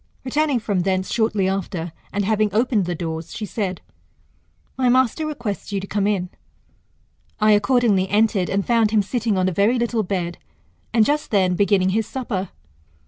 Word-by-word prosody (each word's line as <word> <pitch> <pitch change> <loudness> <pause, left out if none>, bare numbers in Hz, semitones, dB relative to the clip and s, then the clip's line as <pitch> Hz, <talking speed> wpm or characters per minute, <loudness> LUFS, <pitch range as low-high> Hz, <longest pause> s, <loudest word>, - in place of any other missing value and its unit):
Returning 290 0 +1
from 205 -4 -1
thence 185 +1 -1
shortly 215 -4 +1
after, 185 -3 -3 0.2
and 205 0 -1
having 215 0 +2
opened 225 -4 +2
the 175 0 -2
doors, 160 0 -5
she 215 - -4
said, 195 -4 -3 0.9
My 255 -1 +2
master 260 +5 +2
.requests 235 -10 -5
you 200 - -1
to 190 - -6
come 200 0 -1
in. 190 -4 -1 1.1
I 215 0 +4
accordingly 210 -3 +3
entered, 210 -3 +2
and 200 0 0
found 230 -3 +3
him 215 -1 +2
sitting 225 -1 -1
on 185 0 +2
a - - +1
very 205 +8 +2
little 235 -1 0
bed, 180 -3 -3 0.5
and 225 -2 +4
just 295 +3 0
then 190 -4 +2
beginning 195 -1 +2
his 220 +3 0
supper. 205 -8 -4
205 Hz, 170 wpm, -22 LUFS, 190-230 Hz, 1.1 s, I